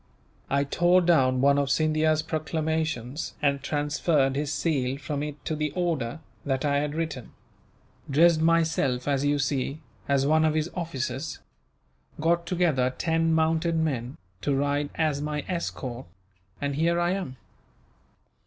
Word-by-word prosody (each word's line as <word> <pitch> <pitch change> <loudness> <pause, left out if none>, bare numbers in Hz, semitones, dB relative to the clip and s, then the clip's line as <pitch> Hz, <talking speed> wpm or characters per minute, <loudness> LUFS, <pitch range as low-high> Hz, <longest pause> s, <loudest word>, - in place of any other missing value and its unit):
I 140 +1 +2
tore 175 +5 +3
down 130 -7 +3
one 140 +1 +4
of 140 -1 0
Scindia's 155 +1 +2
proclamations, 155 -4 -2
and 140 -2 +1
transferred 145 -1 +1
his 145 +1 -1
seal 140 -3 0
from 145 0 -4
it 150 0 -6
to 155 - -1
the 150 0 -1
order 160 -7 -1 0.2
that 135 0 -1
I 140 -1 +2
had 150 +1 -2
written; 155 -7 -4 0.8
dressed 160 +3 +5
myself, 160 -6 +2
as 140 -1 +1
you 145 0 +2
see, 140 +1 -1 0.3
as 140 -1 +3
one 155 +2 +4
of 155 -1 +2
his 155 +2 -1
officers; 150 -3 -4 0.8
got 170 +2 +1
together 160 -8 +2
ten 165 0 +1
mounted 160 +1 +2
men, 140 -6 -1 0.2
to 140 +3 0
ride 145 +1 0
as 155 -3 0
my 150 -1 -3
escort, 130 - -4 0.5
and 140 0 -2
here 170 +4 +1
I 175 +1 +1
am." 185 -10 -4
150 Hz, 145 wpm, -26 LUFS, 140-160 Hz, 0.8 s, dressed